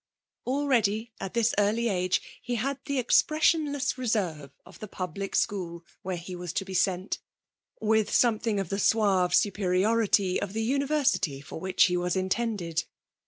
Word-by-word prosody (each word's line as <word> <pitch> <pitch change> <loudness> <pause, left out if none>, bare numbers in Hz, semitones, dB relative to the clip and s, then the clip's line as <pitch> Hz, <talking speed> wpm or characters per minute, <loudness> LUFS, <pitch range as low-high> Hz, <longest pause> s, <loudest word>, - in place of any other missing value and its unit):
Already 235 -5 +1
at 195 - -6
this 235 0 +2
early 215 +3 +2
age 185 -3 0 0.2
he 245 - -3
had 270 +4 -2
the 280 - -2
expressionless 290 +1 +2
reserve 185 - -1 0.2
of - - -15
the 215 - -7
public 190 +1 -5
school 170 -4 -1 0.2
where 185 -1 -3
he 180 +2 -7
was 175 -1 -5
to 195 - -2
be 190 - -7
sent, 185 +1 0 0.6
with 220 -1 +1
something 225 -3 +2
of 195 -4 -3
the 195 - -2
suave 195 -5 +3
superiority 200 0 +2
of 205 -1 -4
the 225 +1 -1
university 275 - +1
for 145 - -9
which 185 +1 +2
he 180 - +3
was 180 +1 -1
intended. 190 -3 -1
205 Hz, 155 wpm, -27 LUFS, 185-235 Hz, 0.6 s, suave